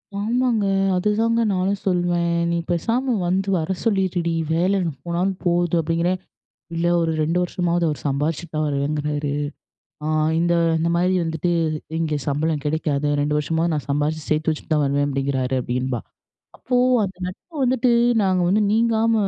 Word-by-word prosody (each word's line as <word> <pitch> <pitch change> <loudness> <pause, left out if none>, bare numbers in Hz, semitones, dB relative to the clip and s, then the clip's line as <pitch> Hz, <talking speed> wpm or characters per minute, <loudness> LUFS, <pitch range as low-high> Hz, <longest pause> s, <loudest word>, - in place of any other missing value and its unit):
ஆமாங்க! 230 +1 +1 0.3
அதுதாங்க 225 +4 +1
நானும் 190 +2 0
சொல்வேன். 175 -2 +1 0.2
"நீ 170 - +1
பேசாம 235 +9 0
வந்து 190 +2 0
வர 165 +1 -1
சொல்லிருடி, 185 -5 +1 0.2
வேல 180 +4 +2 0.3
போனாலும் 175 +3 0
போது" 175 -1 +2
அப்டிங்கிறேன். 170 +3 0 0.6
"இல்ல 165 +1 0 0.2
ஒரு 165 -1 +1
2 165 +3 0
வருஷமாவது 175 -1 0
அவர் 150 - -4
சம்பாதிச்சுட்டு 150 +4 -2
தான் 155 0 +1
வருவேங்கிறாரு. 145 0 -1 0.7
ஆ - - -1 0.3
இந்த 170 +1 +2 0.3
இந்த 165 +1 +1
மாரி 180 +2 +2
வந்துட்டு 165 +1 -1 0.5
இங்க 160 -2 0
சம்பளம் 150 +1 0
கெடைக்காது, 150 -1 0
2 150 +1 +1
வருஷமா 160 +2 0
நான் 150 -3 -2
சம்பாரிச்சு 150 +2 -1
சேர்த்து 155 +1 +1
வச்சுட்டு 155 +1 -3
தான் 150 - +2
வருவேன்" 140 +1 +1
அப்டிங்கிறாரு. 135 -1 -1
அப்டின்பா. 125 -1 -2 0.6
அப்போ 250 - -2 0.3
அந்த 190 -1 -8
நட்பு 250 - -11
வந்துட்டு, 255 -1 +2 0.3
நாங்க 185 -2 +2
வந்து 205 +3 +3
நீங்காம 225 0 +2
170 Hz, 145 wpm, -22 LUFS, 150-190 Hz, 0.7 s, வந்து